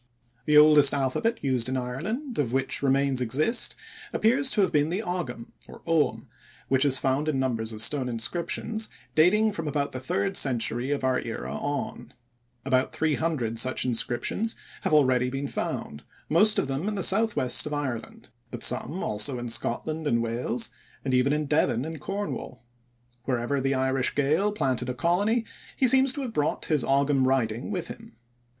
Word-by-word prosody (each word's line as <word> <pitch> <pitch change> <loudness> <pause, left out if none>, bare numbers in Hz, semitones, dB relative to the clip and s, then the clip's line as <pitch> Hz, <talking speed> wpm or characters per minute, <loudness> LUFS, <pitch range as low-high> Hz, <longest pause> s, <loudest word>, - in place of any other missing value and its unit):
The 150 0 +4
oldest 150 -2 +7
alphabet 140 - -1
used 130 -3 0
in 130 - -1
Ireland 190 - -4
of 125 -6 0
which 135 0 0
remains 135 -1 +1
exist 150 - +1 0.4
appears 260 +5 +2
to 215 - +2
have 190 - +2
been 150 -1 +2
the 190 +6 -2
Ogam, 165 - -4 1.2
which 135 +1 +3
is 135 -2 +4
found 135 +3 0
in 145 - 0
numbers 115 -4 -1
of 110 -1 -3
stone 130 +2 0
inscriptions 175 - -3 0.2
dating 210 +7 +4
from 165 -5 -5
about 145 -1 -1
the 130 - -5
third 195 +9 -2
century 120 -2 +1
of 145 -2 -1
our 130 -1 +1
era 115 - -5
on. 145 0 -5 0.5
About 130 -1 +1
300 150 -7 -1
such 130 +2 0
inscriptions 125 - -1 0.3
have - - -2
already 130 -4 +3
been 135 +2 -4
found, 75 - -4 0.3
most 205 +7 +5
of - - +1
them 135 +8 -3
in 215 - -2
the 195 - -1
southwest 195 - +3
of 150 - -5
Ireland, 130 -6 -5 0.2
but - - -6
some - - +1
also 110 +5 0
in 120 0 -5
Scotland 155 +7 -1
and 115 -3 +1
Wales, 120 +1 -2 0.3
and 130 - -1
even 125 +2 +3
in 150 0 0
Devon 140 -4 +1
and 160 -2 -7
Cornwall. 200 -9 -5 0.6
Wherever 130 +2 -1
the 135 +1 0
Irish 130 0 0
Gael 155 +9 +1
planted 130 - -1
a 125 - -3
colony, 205 - +1 0.3
he 265 - +2
seems 265 +1 +5
to 285 - -4
have 240 -3 -5
brought 150 -5 -1
his 150 -5 +1
Ogam 135 -1 +2
writing 120 - 0
with 180 -5 -4
him. 225 0 -10
140 Hz, 170 wpm, -26 LUFS, 125-175 Hz, 1.2 s, oldest